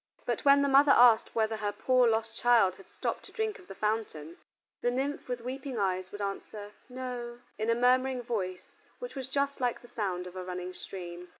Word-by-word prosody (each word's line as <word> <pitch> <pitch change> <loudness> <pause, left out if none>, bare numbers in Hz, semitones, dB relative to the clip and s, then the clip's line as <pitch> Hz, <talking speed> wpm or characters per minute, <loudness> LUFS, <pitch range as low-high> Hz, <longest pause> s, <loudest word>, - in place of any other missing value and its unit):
But - - -2
when 280 0 +6
the - - +2
mother 280 +1 +6
asked 235 -2 +5
whether 220 -1 +1
her 210 -1 -1
poor 255 +3 +3
lost 225 0 -1
child 225 -7 +4
had 195 - -15
stopped - - -3
to - - -13
drink 440 -2 -2
of - - -17
the 195 - -9
fountain, 210 -8 -3 0.4
the 245 - +2
nymph 270 +4 -2
with 245 -1 -3
weeping 260 +1 -5
eyes 185 -2 -1
would 205 - -7
answer 205 +1 -5 0.2
"No," 250 -2 -5 0.2
in 220 +1 -1
a 230 - +4
murmuring 255 +1 +2
voice 185 -6 -4 0.3
which - - -7
was 265 -3 -5
just 280 +1 -1
like 245 -1 0
the - - -13
sound 185 -5 -2
of 180 0 -10
a 185 - -5
running 180 0 -5
stream. 180 -1 -8
230 Hz, 205 wpm, -30 LUFS, 195-255 Hz, 0.4 s, when